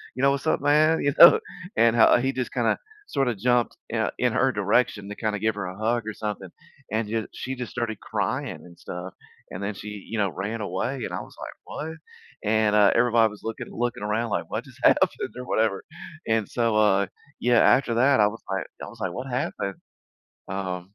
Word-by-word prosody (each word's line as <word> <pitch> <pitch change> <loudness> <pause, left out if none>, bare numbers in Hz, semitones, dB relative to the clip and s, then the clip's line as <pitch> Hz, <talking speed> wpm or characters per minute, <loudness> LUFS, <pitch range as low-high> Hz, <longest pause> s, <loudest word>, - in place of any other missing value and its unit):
You 130 - -3
know, 140 - +6
what's 140 +2 -2
up, - - +2
man?" 155 +2 +4
You 140 - +2
know? 170 - +10 0.4
And, 115 0 +4
uh, 115 - +6
he 130 +2 0
just 130 -2 -3
kinda 115 -3 +1 0.3
sorta 125 - 0
jumped 120 +3 +1
in, - - -2
uh - - +1
in - - +1
her - - +3
direction 100 -1 +1
to 105 - -6
kinda 110 -2 -2
give 110 +2 +1
her 105 -3 -4
a 90 +1 -7
hug 115 +2 0
or 110 - -3
something, 105 -3 -5 0.4
and 110 0 0
ju 110 +1 -2
she 130 +1 -5
just 125 -1 -6
started 110 -3 -3
crying - - -2
and 85 -1 -16
stuff, 90 +1 -7 0.4
and 90 - -6
then 100 +1 -3
she, 105 - -9 0.2
you 115 - -3
know, 100 -2 +2
ran 105 +5 -4
away, 100 +7 -2
and - - -6
I - - -2
was - - -13
like, - - -7
"What?" 160 +1 -6 0.5
And, 110 0 +2
uh, 105 -1 +6
everybody 115 -2 +4
was 105 - -12
looking 115 0 -5
looking 120 -3 -2
around 110 +2 -1
like, - - -2
"What - - -3
just - - -16
happened?" - - +5 0.3
Or 125 - -6
whatever, 110 -5 0 0.4
and 110 -2 +1
so, 115 -2 0
uh, 105 -2 +4 0.3
yeah, 120 -1 +4
after 125 -3 +4
that, 130 +2 +4
I 105 - +6
was 115 +2 -6
like 95 -1 -2 0.2
I - - -6
was - - -12
like, 90 -2 -2
"What 130 +6 -6
happened?" 125 - -2 0.7
Um 95 0 -5
110 Hz, 215 wpm, -25 LUFS, 100-125 Hz, 0.7 s, know